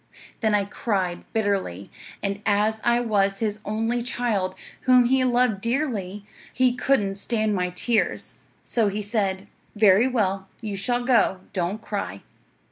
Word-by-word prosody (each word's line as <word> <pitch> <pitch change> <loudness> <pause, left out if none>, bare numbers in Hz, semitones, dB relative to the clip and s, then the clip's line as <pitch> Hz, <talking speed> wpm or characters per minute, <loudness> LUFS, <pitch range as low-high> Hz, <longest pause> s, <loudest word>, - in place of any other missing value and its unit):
Then 220 -2 +2
I 200 -1 +1
cried 195 -4 -2
bitterly, 195 - -1 0.3
and 200 0 -2
as 215 +1 +1
I 240 0 +3
was 200 -4 +1
his 215 -1 -2
only 225 +3 -1
child, 225 -6 -1 0.3
whom 250 -1 +7
he 260 +1 +3
loved 245 -5 +2
dearly, 220 -6 -2 0.3
he 255 -1 +2
couldn't 250 -6 +1
stand 215 -1 0
my 180 -2 0
tears, 215 +6 -1 0.2
so 225 -3 +2
he 205 +1 -2
said: 200 -2 -1 0.3
"Very 210 +2 +5
well; 195 -6 0
you 215 -3 -4
shall 245 +5 -1
go. 225 -7 +3
Don't 190 +3 -2
cry." 200 - -4
210 Hz, 140 wpm, -24 LUFS, 195-240 Hz, 0.3 s, whom